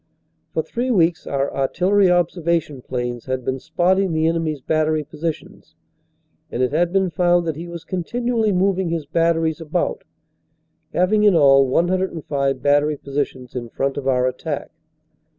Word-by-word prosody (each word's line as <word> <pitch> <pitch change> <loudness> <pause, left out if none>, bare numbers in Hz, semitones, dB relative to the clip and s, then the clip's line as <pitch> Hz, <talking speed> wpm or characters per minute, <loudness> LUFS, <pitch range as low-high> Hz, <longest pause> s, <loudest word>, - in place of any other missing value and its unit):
For - - -1
three 245 +2 -3
weeks 175 -7 +2
our 140 0 -1
artillery 185 +8 +2
observation 170 -5 0
planes 120 -2 -4
had 130 -1 -3
been 130 0 -1
spotting 180 +4 +1
the 160 0 +1
enemy 165 -1 0
s 145 - -9
battery 155 +2 0
positions, 155 +2 -6 0.8
and 125 - -1
it 125 - 0
had 170 +3 +1
been 190 -1 +1
found 175 +1 +2
that 160 -3 -2
he 165 +3 -7
was 170 -1 -8
continually 225 +4 -1
moving 190 -1 +1
his 165 -3 -2
batteries 165 +1 +1
about, 460 - -2 0.9
having 210 +4 +2
in 205 -3 +5
all 135 -3 +6
105 160 -4 0
battery 145 +1 +3
positions 135 -3 -4
in 120 -2 -5
front 135 +3 -2
of 140 -2 -4
our 125 -1 +2
attack. 130 0 -3
160 Hz, 150 wpm, -21 LUFS, 140-180 Hz, 0.9 s, all